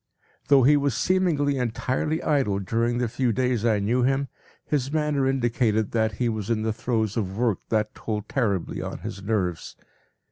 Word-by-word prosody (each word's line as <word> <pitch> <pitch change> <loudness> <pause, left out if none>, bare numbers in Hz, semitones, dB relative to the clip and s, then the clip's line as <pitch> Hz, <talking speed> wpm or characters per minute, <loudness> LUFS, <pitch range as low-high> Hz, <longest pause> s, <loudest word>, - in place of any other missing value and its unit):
Though 140 -3 +6
he 145 +4 +6
was 140 -4 0
seemingly 150 -5 +1
entirely 130 +6 -1
idle 135 -10 +1
during 115 +5 0
the 120 0 0
few 120 +2 0
days 125 0 0
I 115 -3 +3
knew 110 +5 +1
him, 135 +2 +1 0.4
his 140 -2 -1
manner 150 -3 +1
indicated 120 -4 +1
that 110 -1 +1
he 120 +3 -1
was 110 -3 -3
in 110 -2 0
the 110 0 0
throes 110 -2 -1
of 95 -3 -2
work 115 -5 +1
that 110 -1 0
told 105 -1 -4
terribly 100 -10 -1
on - - -5
his 100 - -6
nerves. 95 -5 -2
120 Hz, 175 wpm, -25 LUFS, 110-135 Hz, 0.4 s, Though